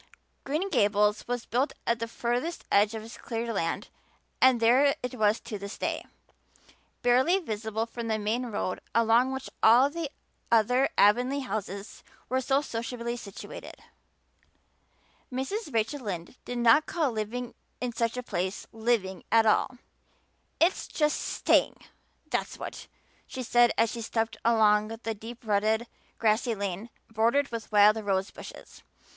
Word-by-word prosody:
Green 310 +8 -1
Gables 210 - +2
was 245 -1 -3
built 260 +5 0
at 235 0 +1
the 230 - -2
furthest 245 +8 -2
edge 205 +2 +4
of 220 - -5
his 225 +2 -11
cleared 230 0 -3
land 165 -4 -2 0.5
and 260 -2 +6
there 255 +5 +4
it 250 - -3
was 215 -2 +2
to 215 -4 -6
this 200 +1 -7
day, - - -2 1.0
barely 260 +9 +4
visible 220 - -3
from 235 0 -6
the 220 -1 0
main 220 +4 -1
road 205 -4 -3 0.2
along 230 +3 +4
which 265 0 -5
all 250 +5 +6
the 330 -2 -4 0.4
other 250 +4 +4
Avonlea 250 +7 +4
houses 200 -4 -5 0.3
were 260 +1 +1
so 270 +2 +2
sociably 235 -1 -4
situated. 205 -4 -9 1.6
Mrs. 290 - -3
Rachel 230 +5 0
Lynde 190 -4 -6
did 245 - -4
not 240 +6 +5
call 315 -6 0
living 235 +3 -4 0.3
in 250 -1 -3
such 230 +1 -1
a 250 - -3
place 190 -4 -3
living 220 -5 -1
at 225 0 +5
all. 235 +3 +2 0.8
"It's 340 +4 +2
just 300 -1 0
staying, - - +2 0.5
that's - - -3
what," - - -7 0.4
she 260 - -5
said 240 0 +4
as 230 -1 +3
she 235 - -5
stepped 225 0 -2
along 215 -2 +4
the 225 0 -4
deep 225 +3 -10
rutted, 215 +2 +1 0.3
grassy 225 +1 +1
lane 200 +2 -4 0.2
bordered 230 +6 +2
with 230 -1 -6
wild 210 +1 +6
rose 195 -1 0
bushes. - - -12
230 Hz, 145 wpm, -28 LUFS, 215-250 Hz, 1.6 s, and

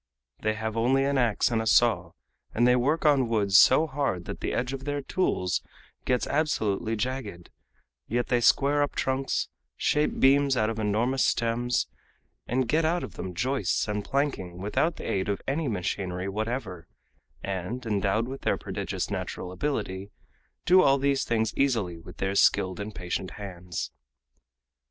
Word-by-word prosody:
They 110 0 0
have 110 0 -3
only 130 +4 +2
an 140 0 +1
ax 120 0 +2
and 115 -1 +1
a 110 - -3
saw, 120 +1 +3 0.4
and 120 +2 +4
they 125 - +5
work 145 +7 +1
on 140 -4 +4
woods 100 -4 +1
so 140 +5 +6
hard 140 - -2
that - - -6
the - - -2
edge 125 +2 -1
of 135 0 -6
their 145 -1 -2
tools 110 - 0 0.4
gets 125 -1 +1
absolutely 115 -8 0
jagged; 110 -6 -4 0.6
yet 120 +1 0
they 120 -1 +2
square 145 +4 +4
up 145 - -1
trunks, 135 +1 -1 0.3
shape 150 0 +1
beams 135 0 +4
out 110 0 +2
of 110 - -5
enormous 115 +5 +1
stems, 120 +1 +1 0.6
and 125 +1 0
get 160 +6 +2
out 170 +2 +1
of - - -7
them 90 -1 -6
joists 130 +7 0
and 105 0 -2
planking 135 -12 -2
without 105 - 0
the - - -7
aid 95 0 -1
of 100 - -1
any 145 +3 -1
machinery 90 -3 -2
whatever, 110 -3 -4 0.6
and, 100 +6 -4
endowed 105 +1 0
with 135 +1 -7
prodigious - - -2
natural 90 - -4
ability, 95 -5 -3 0.6
do 185 +1 +6
all 140 -4 +4
these 140 0 +1
things 110 -1 0
easily 110 -11 0
with - - -13
their 95 0 -1
skilled 95 -1 +3
and 105 +1 -6
patient 90 +1 -3
hands. 90 -3 -6
115 Hz, 160 wpm, -27 LUFS, 100-135 Hz, 0.6 s, so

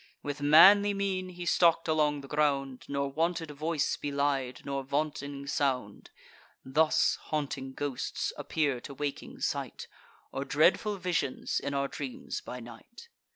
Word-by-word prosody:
With 145 0 -4
manly 200 +8 +7
mien 190 -2 -1
he 175 -1 -7
stalk'd 170 -1 +3
along 150 -2 +2
the 140 - -11
ground, 140 -3 0
Nor 140 0 -2
wanted 165 +1 -1
voice 155 +1 -1
belied, 140 -3 -1
nor 140 0 -2
vaunting 140 0 -3
sound. 130 -7 -1 0.6
(Thus 155 +4 +3
haunting 135 -3 -3
ghosts 145 -3 -3
appear 145 -6 -1
to 140 - -9
waking 145 0 -5
sight, - - -3 0.4
Or 135 - -3
dreadful 175 +9 +2
visions 175 -8 -1
in 140 0 -3
our 140 0 +1
dreams 135 -2 -6
by 125 - -7
night.) 120 - -13
145 Hz, 135 wpm, -30 LUFS, 140-165 Hz, 0.6 s, manly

